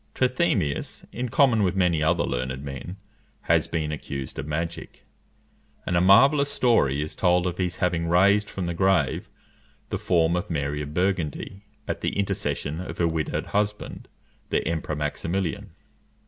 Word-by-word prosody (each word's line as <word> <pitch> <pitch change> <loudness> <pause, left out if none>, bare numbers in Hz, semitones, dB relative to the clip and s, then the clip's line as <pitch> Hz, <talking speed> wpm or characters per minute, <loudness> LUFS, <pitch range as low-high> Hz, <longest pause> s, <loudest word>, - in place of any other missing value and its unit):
Trithemius, 125 - 0
in 125 +1 -3
common 120 -4 +4
with 95 -2 +1
many 90 -4 +2
other 80 - +2
learned 65 +2 -3
men, 70 +7 -7 0.4
has - - +2
been 80 -2 -2
accused 70 -3 -5
of 70 - -5
magic; 85 +2 -5 0.8
and 90 - -1
a 85 - +4
marvellous 135 +10 +6
story 75 - +2
is 75 - -6
told 90 -1 +2
of 90 0 -3
his 90 -1 -1
having 85 -2 0
raised 100 +4 +4
from 95 - -4
the 85 - -2
grave 90 -5 +1 0.6
the - - -2
form 85 -1 +2
of 90 +4 -3
Mary 75 -2 -2
of 75 +1 -7
Burgundy, 95 +2 -2 0.2
at - - -3
the - - -2
intercession 85 -5 -2
of 90 - -7
her 85 - +2
widowed 80 -1 -2
husband, 105 0 -2 0.4
the - - 0
Emperor 80 -1 -2
Maximilian. 80 +4 -2
85 Hz, 155 wpm, -25 LUFS, 75-100 Hz, 0.8 s, marvellous